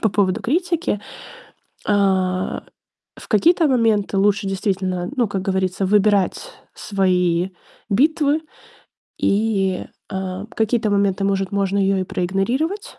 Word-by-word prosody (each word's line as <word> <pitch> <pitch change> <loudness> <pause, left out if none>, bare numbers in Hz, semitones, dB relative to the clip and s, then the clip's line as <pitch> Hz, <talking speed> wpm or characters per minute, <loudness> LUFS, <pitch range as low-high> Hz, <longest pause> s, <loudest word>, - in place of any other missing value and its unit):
по 220 - +2
поводу 195 -2 +1
критики?" 340 - 0 0.9
А, 190 -3 +1 0.5
в - - -12
какие-то 330 - +4
моменты 225 -7 +2
лучше 200 +1 +2
действительно, 190 -2 -2
ну, 245 -3 +2
как 195 -2 -3
говорится, 190 0 -1
выбирать 205 - +2 0.2
свои 180 -2 +1 0.4
битвы. 295 +6 +2 0.8
И, 200 -3 +1 0.3
а, 190 0 -4
в 225 - -15
какие-то 220 0 +1
моменты, 200 -1 +1
может, 195 -1 0
можно 200 -1 0
ее 195 0 +2
и - - -1
проигнорировать, 235 - -2
200 Hz, 115 wpm, -20 LUFS, 190-225 Hz, 0.9 s, какие-то